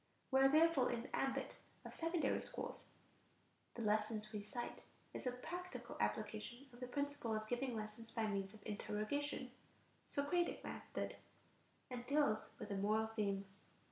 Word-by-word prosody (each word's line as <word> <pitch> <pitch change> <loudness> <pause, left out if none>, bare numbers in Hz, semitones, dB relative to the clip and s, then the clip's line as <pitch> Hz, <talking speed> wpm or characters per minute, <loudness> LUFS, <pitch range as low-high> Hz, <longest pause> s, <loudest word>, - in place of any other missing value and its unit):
We 265 - +6
are 270 - +9
therefore 310 -3 +6
in 235 -1 0
the - - -3
ambit 270 0 0 0.3
of - - -6
secondary 330 0 +2
schools. - - -4 0.9
The 235 - -2
lesson 215 +1 +3
we 210 - -1
cite 225 +4 -4 0.3
is - - -3
a - - +3
practical 355 +9 -5
application 250 +3 -1
of 240 - -12
the 250 - -3
principle 285 -3 0
of 215 0 -2
giving 245 +1 0
lessons 215 +1 -5
by 225 -2 +1
means 200 -1 -1
of 210 - -15
interrogation 250 +6 -1 0.6
(Socratic 310 +5 +1
method), - - -3 0.7
and 245 -1 -4
deals 280 -7 +3
with - - -5
a 200 - +1
moral 215 +3 +3
theme: 200 -2 +1
rights. - - -21
240 Hz, 155 wpm, -41 LUFS, 215-280 Hz, 0.9 s, are